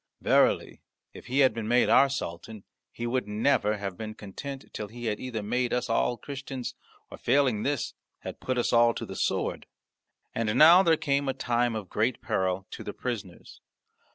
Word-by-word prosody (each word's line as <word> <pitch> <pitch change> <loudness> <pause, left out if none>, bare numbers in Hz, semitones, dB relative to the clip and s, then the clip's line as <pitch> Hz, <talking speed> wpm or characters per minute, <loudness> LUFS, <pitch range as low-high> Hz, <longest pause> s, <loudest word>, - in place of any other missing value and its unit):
Verily - - +2 0.3
if - - -12
he 135 +3 +2
had 130 - +5
been 110 -2 -4
made 120 +2 +4
our 140 - +6
sultan 105 -4 -6 0.3
he 120 - -6
would 125 -2 -1
never 105 0 +1
have 100 -2 -5
been 110 -1 -6
content 135 +7 -8
till 105 - -5
he 120 +3 -9
had 105 -2 -1
either 115 -4 -4
made 125 +4 -1
us 125 -1 -1
all 120 +1 +1
Christians, 135 -2 -6 0.4
or, - - -10
failing 130 -7 +2
this, 140 +1 -1 0.3
had - - -7
put 130 -1 -2
us 120 - 0
all 115 0 +5
to - - -4
the - - -8
sword." - - -1 0.7
And 110 -2 -1
now 170 +4 +9
there 165 -4 +3
came 140 -1 0
a 135 - -1
time 120 -1 0
of 105 -3 -5
great 115 +6 0
peril 95 -4 -1
to - - -7
the - - -6
prisoners. - - -6
120 Hz, 185 wpm, -28 LUFS, 110-135 Hz, 0.7 s, now